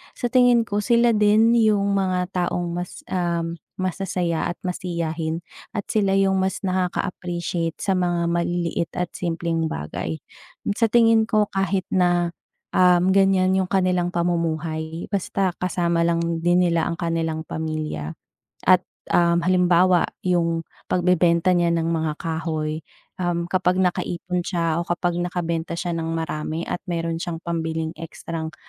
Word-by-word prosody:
Sa 245 - -2
tingin 245 -2 +5
ko 205 -2 -2
sila 235 +2 +3
din 215 +1 +4
yung 210 -3 +3
mga 185 -2 0 0.2
taong 175 0 -2
mas 175 +1 -6
um, 170 -2 -1 0.2
masasaya, 180 -2 -1
at 175 - -10
masiyahin, 170 -3 -2 0.3
at 205 - -4
sila 200 -3 +1
yung 195 0 +3
mas 190 0 0
nakaka-appreciate 175 -2 -2
sa 195 -2 0
mga 175 -2 0
maliliit 170 0 -1
at 180 - -1
simpleng 165 -2 -1
bagay. 80 +2 -4 0.6
Sa 230 -1 +1
tingin 230 -2 +5
ko 215 -1 +2
kahit 195 -1 -1
na 175 -2 +1 0.4
um, 180 0 +5
ganyan 190 -1 +4
yung 190 -1 0
kanilang 180 -2 +1
pamumuhay 165 -2 -2
basta 195 -2 -1
kasama 170 -2 +1
lang 170 -1 0
din 175 +1 +4
nila 170 -1 +1
ang 170 - -5
kanilang 165 -2 -2
pamilya. 155 - -3 0.5
At - - +6 0.3
um, 170 0 +3
halimbawa 180 0 +4 0.2
yung 170 -2 +1 0.2
pagbebenta 180 0 +3
niya 175 -1 +3
ng 165 0 0
mga 160 -2 -1
kahoy, 160 -1 -3 0.4
um, 175 -1 0
kapag 185 -1 +2
nakaipon 180 -1 -1
siya 170 -3 0
o 170 - -4
kapag 175 0 -1
nakabenta 170 -1 -2
siya 175 +1 -3
ng 165 -1 -2
marami 160 0 -3
at 175 - -3
meron 165 -1 -2
siyang 170 -1 -5
pambiling 160 -1 -2
ekstrang 165 0 -6
175 Hz, 140 wpm, -23 LUFS, 165-185 Hz, 0.6 s, At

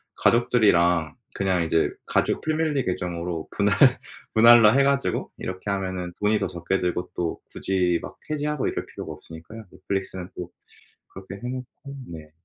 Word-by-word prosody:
가족들이랑 90 -9 +3 0.2
그냥 95 -3 0
이제 80 0 +2 0.2
가족 - - 0
패밀리 155 -3 0
계정으로 85 -2 -3
분할 100 -2 +4 0.3
분할로 115 -1 +8
해 135 +1 +4
가지고 140 0 0
이렇게 95 +2 -5
하면은 95 -3 -3
돈이 105 +1 +2
더 95 - -1
적게 85 +2 -2
들고 90 0 -2
또 85 -2 -2
굳이 90 -3 0
막 - - -9
해지하고 150 -1 -1
이럴 - - -3
필요가 - - -8
없으니까요. 85 +8 -12
넷플릭스는 95 -1 -4
또 90 -1 -6 0.6
그렇게 95 0 -10
해 120 +5 -7
놓고 130 0 -4 0.4
네. 80 -2 -10
95 Hz, 340 characters per minute, -24 LUFS, 90-115 Hz, 0.6 s, 분할로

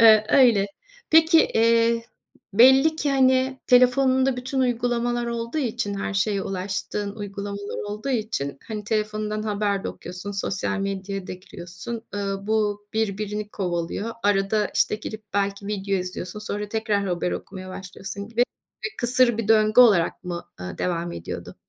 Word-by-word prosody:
Iıı, 220 -1 +8
öyle. 235 -7 +5 0.4
Peki, 320 +1 +6 0.2
eee, 230 0 +3 0.5
belli 265 +8 +6
ki, 290 -3 0
hani, 260 -1 +3
telefonunda 260 +1 +4
bütün 260 +2 -2
uygulamalar 240 -1 0
olduğu 235 +5 -3
için 235 -6 -2
her 200 0 -3
şeye 195 0 +1
ulaştığın 195 +2 -3
uygulamalar 200 0 -5
olduğu 210 +6 -5
için, 210 - -2
hani, 215 -2 -5
telefonundan 215 0 -1
haber 205 -2 -1
de - - -1
okuyorsun, 180 +3 -7
sosyal 200 +1 -2
medyaya 195 -1 -3
da - - -5
giriyorsun. 185 +4 -8
Iıı, 195 -1 -3
bu 210 -1 0
birbirini 210 -1 -2
kovalıyor. 180 +3 -3
Arada, 205 +1 +2
işte, - - +2
girip 215 0 -7
belki 200 0 -1
video 200 -1 -1
izliyorsun 180 +1 -5
sonra 210 0 -4
tekrar 215 -2 0
haber 180 -1 -1
okumaya 185 -1 -7
başlıyorsun 195 +2 -7
gibi 230 +1 +2 0.4
bir 435 - -4
kısır 245 -1 +3
bir 220 -2 -2
döngü 215 +1 +5
olarak 200 -8 +4
mı, 175 -1 -4 0.2
ııı, 90 0 -6
devam 175 -1 -2
ediyordu? 85 - -7
210 Hz, 145 wpm, -24 LUFS, 195-235 Hz, 0.5 s, Iıı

